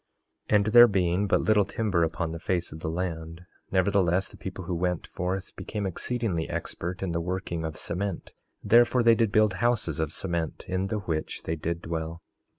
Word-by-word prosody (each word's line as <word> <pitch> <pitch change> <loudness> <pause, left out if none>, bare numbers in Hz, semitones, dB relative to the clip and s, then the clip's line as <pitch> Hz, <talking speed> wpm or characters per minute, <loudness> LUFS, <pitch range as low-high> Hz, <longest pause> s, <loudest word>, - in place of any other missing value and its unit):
3:7 - - +4
And 100 -1 +4
there 120 0 +10
being 95 -1 +1
but 100 - +3
little 105 -1 +4
timber 100 -3 0
upon 80 0 -1
the 85 - -5
face 90 0 -1
of 80 - -8
the 80 - -3
land, 85 -1 -4 0.3
nevertheless 95 -1 +2
the - - -13
people 95 -1 -7
who 90 - -3
went 90 0 -1
forth 90 +2 -4
became 105 -2 -4
exceedingly 95 -2 -2
expert 90 +3 -4
in 95 - -1
the 85 0 -1
working 90 -1 -3
of 80 -1 -4
cement; 95 +1 -4 0.3
therefore 120 +1 +5
they 115 0 +7
did 115 -2 +2
build 105 -2 +4
houses 115 -11 +1
of 80 -1 -1
cement, 85 -2 -3
in 95 +1 -1
the 105 0 -2
which 80 -4 -3
they 80 - -2
did 85 +2 -3
dwell. 80 0 -4
90 Hz, 190 wpm, -27 LUFS, 85-100 Hz, 0.3 s, there